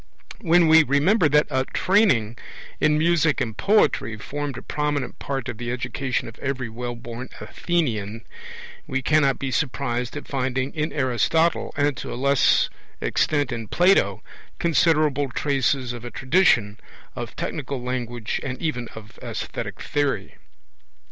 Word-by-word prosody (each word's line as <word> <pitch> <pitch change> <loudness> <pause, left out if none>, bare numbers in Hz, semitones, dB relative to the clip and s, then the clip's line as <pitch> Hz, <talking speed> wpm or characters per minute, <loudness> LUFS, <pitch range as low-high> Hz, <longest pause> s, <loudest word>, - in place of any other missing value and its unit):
When 170 0 +4
we 160 +1 +8
remember 155 - +3
that 150 +1 +4
a 130 -1 +1
training 180 - +3 0.4
in 150 0 +3
music 160 -1 +2
and 115 -5 -2
poetry 195 - +2
formed 145 +3 -5
a - - -8
prominent 145 -3 -2
part 135 -3 -3
of 120 -3 -6
the 120 0 -3
education 130 +1 -2
of 115 - -11
every 130 -3 -3
wellborn 120 +1 -6
Athenian, 115 - -2 0.6
we 135 0 -2
cannot 140 -2 +3
be 135 -1 -3
surprised 125 0 -2
at 145 - -8
finding 130 0 -2
in 155 0 -2
Aristotle, 150 +5 +1
and 145 -1 +2
to - - -6
a - - -4
less 140 +2 +3 0.3
extent 145 - 0
in 115 -2 -4
Plato, 180 - +3 0.3
considerable 155 -4 +2
traces 135 -2 0
of 120 -1 -8
a 120 - -5
tradition 125 - +2 0.4
of - - -6
technical 140 -2 -4
language 120 -2 -3
and 130 -2 -5
even 125 -7 -2
of 110 -1 -12
aesthetic - - -5
theory. 135 -9 -1
135 Hz, 140 wpm, -23 LUFS, 120-150 Hz, 0.6 s, we